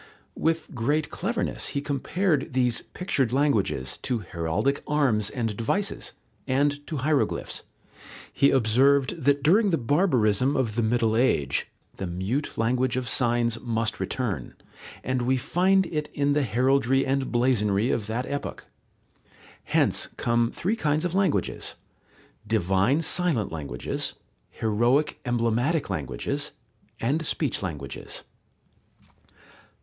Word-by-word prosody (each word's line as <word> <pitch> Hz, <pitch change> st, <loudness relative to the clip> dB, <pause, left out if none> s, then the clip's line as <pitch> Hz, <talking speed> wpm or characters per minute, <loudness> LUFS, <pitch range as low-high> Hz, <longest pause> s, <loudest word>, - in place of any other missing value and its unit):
With 165 Hz, +1 st, -1 dB
great 145 Hz, +5 st, 0 dB
cleverness -, -, -2 dB
he -, -, +3 dB
compared 145 Hz, +2 st, -1 dB
these 125 Hz, -2 st, +2 dB
pictured 140 Hz, -, -2 dB
languages 110 Hz, -, +1 dB
to 125 Hz, -2 st, -1 dB
heraldic 85 Hz, +12 st, 0 dB
arms 130 Hz, -9 st, +2 dB
and 115 Hz, -5 st, -2 dB
devices, 195 Hz, -, -2 dB, 0.3 s
and 145 Hz, +2 st, +1 dB
to 155 Hz, -, -3 dB
hieroglyphs. 150 Hz, -3 st, 0 dB, 0.7 s
He 140 Hz, -, +4 dB
observed 135 Hz, +6 st, +3 dB
that 140 Hz, +1 st, +2 dB
during 200 Hz, +7 st, +4 dB
the 165 Hz, -, +2 dB
barbarism 130 Hz, -, +2 dB
of 120 Hz, -5 st, 0 dB
the 120 Hz, -, 0 dB
Middle 115 Hz, 0 st, +2 dB
Age, 75 Hz, -, +1 dB, 0.3 s
the 95 Hz, -, -3 dB
mute 95 Hz, -, -3 dB
language 125 Hz, +2 st, +1 dB
of 130 Hz, -1 st, -2 dB
signs 120 Hz, -1 st, +1 dB
must 115 Hz, -2 st, -1 dB
return, 105 Hz, -, -3 dB, 0.5 s
and 130 Hz, -1 st, -1 dB
we 130 Hz, +2 st, +2 dB
find 185 Hz, +8 st, +2 dB
it 150 Hz, -3 st, -3 dB
in 145 Hz, 0 st, +2 dB
the 150 Hz, -, +2 dB
heraldry 135 Hz, +2 st, +2 dB
and 135 Hz, 0 st, -1 dB
blazonry 120 Hz, -3 st, +2 dB
of 110 Hz, -3 st, -1 dB
that 115 Hz, +3 st, -2 dB
epoch. 140 Hz, 0 st, -5 dB, 1.0 s
Hence -, -, +1 dB
come 115 Hz, 0 st, +2 dB
three 195 Hz, -, -1 dB
kinds 155 Hz, -4 st, 0 dB
of 175 Hz, -, -2 dB
languages: 190 Hz, -4 st, 0 dB, 0.7 s
divine 105 Hz, -, +2 dB
silent 165 Hz, -, +1 dB
languages, 70 Hz, -6 st, -4 dB, 0.3 s
heroic 120 Hz, +7 st, +1 dB
emblematic 120 Hz, +6 st, 0 dB
languages, 70 Hz, -4 st, -3 dB, 0.5 s
and 145 Hz, +8 st, 0 dB
speech 150 Hz, -3 st, 0 dB
languages. 75 Hz, -8 st, -6 dB
130 Hz, 120 wpm, -26 LUFS, 110-145 Hz, 1.0 s, He